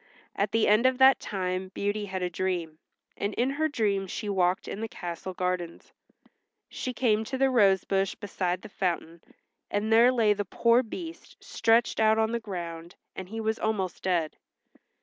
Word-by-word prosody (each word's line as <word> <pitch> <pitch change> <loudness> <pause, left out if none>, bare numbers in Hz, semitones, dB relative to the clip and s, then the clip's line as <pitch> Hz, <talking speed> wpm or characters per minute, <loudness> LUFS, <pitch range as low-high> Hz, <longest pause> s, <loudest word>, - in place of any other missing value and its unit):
At 200 +1 0
the 225 -1 +2
end 215 +5 +5
of 260 -1 +1
that 265 +1 +6
time 185 -1 -3
Beauty 205 +1 -1
had 190 -2 -4
a 180 - 0
dream, 170 -3 -3 0.4
and 205 +1 -3
in 255 +3 +1
her 310 +3 0
dream 205 -9 0
she 205 +3 -5
walked 185 -2 +1
in 210 - -5
the 225 - -2
castle 180 -2 -6
gardens. 180 -2 -3 0.8
She 255 - -4
came 220 -4 +1
to 265 +3 -4
the 270 0 +3
rose 200 -6 +4
bush 195 -1 0
beside 185 -3 -3
the 215 - -9
fountain, 170 -3 -3 0.5
and 210 +2 0
there 235 +3 +7
lay 225 -4 +3
the 205 0 -3
poor 235 +5 +3
Beast 325 +8 -9
stretched 230 +1 +2
out 220 0 +4
on 220 0 +1
the 235 - -1
ground, 170 -5 -7 0.2
and 185 -1 -7
he 225 +2 -5
was 220 0 -1
almost 195 -5 -2
dead. 170 -4 -1
205 Hz, 180 wpm, -27 LUFS, 185-225 Hz, 0.8 s, there